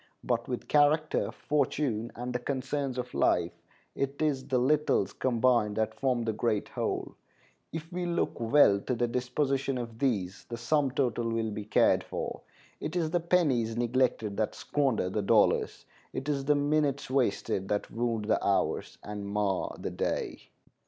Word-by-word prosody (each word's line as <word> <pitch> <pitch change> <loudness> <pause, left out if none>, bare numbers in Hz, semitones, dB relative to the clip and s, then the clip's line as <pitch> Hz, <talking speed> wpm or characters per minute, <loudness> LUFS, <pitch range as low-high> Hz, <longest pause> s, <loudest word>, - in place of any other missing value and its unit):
But 120 -1 -1
with 125 -1 -4
character, 150 +1 +3
fortune, 135 -5 -1
and 125 +1 -4
the 125 - -1
concerns 135 0 -2
of 125 0 -4
life, 85 -1 +2 0.4
it 140 +1 -3
is 140 -4 0
the 130 -3 +1
littles 135 -6 +2
combined 120 -4 +2
that 110 0 0
form 125 -3 0
the 110 -1 -1
great 110 -1 -1
whole. - - -3 0.6
If 165 +2 -7
we 180 0 -2
look 170 0 -1
well 115 -4 +5
to 125 +5 -2
the 120 +1 +1
disposition 135 +2 -1
of 115 -2 -6
these, 100 -8 -1
the 115 - -4
sum 140 +4 +1
total 120 -3 0
will 115 -1 -1
be 105 0 -5
cared 105 - +3
for. - - -5 0.4
It 155 - -4
is 165 -3 0
the 175 - +2
pennies 140 -10 +1
neglected 120 -4 +1
that 110 - -1
squander 135 -10 0
the 100 +3 -1
dollars. 100 - +2 0.3
It 135 - -4
is 140 -2 -1
the 150 +1 +4
minutes 145 -2 +1
wasted 115 -7 0
that 105 0 -2
wound 115 -2 -1
the 110 - +1
hours, 100 - 0
and 105 -1 -6
mar 100 -2 -1
the - - -4
day. - - -3
125 Hz, 165 wpm, -29 LUFS, 110-145 Hz, 0.6 s, well